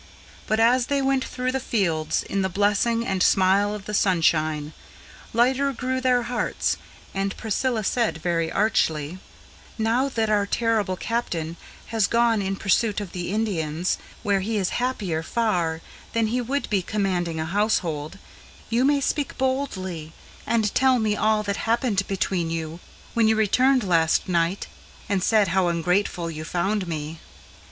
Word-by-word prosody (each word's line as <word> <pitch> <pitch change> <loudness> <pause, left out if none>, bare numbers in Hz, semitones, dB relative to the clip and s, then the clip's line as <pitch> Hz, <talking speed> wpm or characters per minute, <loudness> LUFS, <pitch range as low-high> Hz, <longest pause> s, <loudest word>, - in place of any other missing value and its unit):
But, 215 +1 +1
as 240 +2 +4
they 280 0 +1
went 270 -1 +1
through 255 0 -2
the 265 - -1
fields 175 -11 0
in 195 - -2
the 190 - 0
blessing 210 +4 +1
and 190 -3 -1
smile 195 +3 +3
of 205 -1 -9
the 210 - -5
sunshine, 155 -5 +1 0.6
Lighter 260 +4 +2
grew 260 +1 -2
their 250 -1 +3
hearts, 240 +1 -1 0.4
and 195 0 -2
Priscilla 225 +1 -1
said 230 -3 0
very 165 0 -1
archly: 170 -6 0 0.6
"Now 235 +5 +1
that 225 -4 0
our 205 -1 +2
terrible 220 -4 +1
Captain 175 -7 -3 0.4
has 220 -3 +3
gone 230 -2 +2
in 195 0 -1
pursuit 210 +3 +1
of 200 -4 -6
the 180 0 -4
Indians, 180 -6 -1 0.2
Where 200 -1 +2
he 215 +3 -2
is 190 -3 0
happier 200 -11 -1
far 170 -5 0 0.3
than 230 -1 +2
he 250 - +1
would 275 +4 -2
be 200 -2 +2
commanding 180 -5 -1
a 160 - -1
household, 170 -4 -1 0.5
You 235 +2 +3
may 285 0 +3
speak 290 +1 -1
boldly, 190 - -2 0.3
and 220 -3 +1
tell 260 -1 +4
me 215 -2 +1
of - - -5
all 215 0 +3
that 200 -1 -2
happened 225 -4 0
between 185 -3 -1
you, 165 0 -4 0.3
When 230 -2 +3
you 220 - +4
returned 250 +4 +3
last 165 -4 +2
night, 175 +1 0 0.4
and 195 -2 0
said 215 -4 +3
how 185 +1 +2
ungrateful 175 0 0
you 155 -1 -6
found 185 +4 -1
me." 155 0 -5
205 Hz, 160 wpm, -24 LUFS, 175-230 Hz, 0.6 s, as